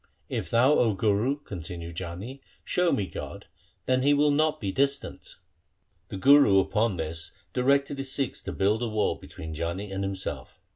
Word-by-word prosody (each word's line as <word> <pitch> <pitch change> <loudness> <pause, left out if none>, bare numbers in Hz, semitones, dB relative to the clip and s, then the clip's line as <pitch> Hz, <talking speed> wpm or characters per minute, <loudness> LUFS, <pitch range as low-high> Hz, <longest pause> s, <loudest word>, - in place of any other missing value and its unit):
1 - - -36
' - - -42
If - - -7
thou, 125 +5 +4
O 110 -4 +2
Guru 110 +8 +1
', - - -33
continued 85 -2 -7
Jani, 95 +10 -7
' - - -34
show 180 -1 +3
me 100 - +1
God, 85 - -8 0.4
then 130 0 +2
He 145 +2 +4
will 145 +1 +3
not 155 +1 +2
be 100 -2 -2
distant.' 140 +4 -2 0.7
The 95 - -6
Guru 140 -3 +6
upon 105 +1 +1
this 80 0 -5 0.2
directed 140 +2 +2
his 135 -1 -3
Sikhs 135 -2 -2
to - - -3
build 105 +4 +1
a 120 - 0
wall 105 -1 +1
between 80 0 -9
Jani 85 +6 -4
and 95 0 -3
himself. 95 -9 -5
110 Hz, 190 wpm, -27 LUFS, 95-135 Hz, 0.7 s, Guru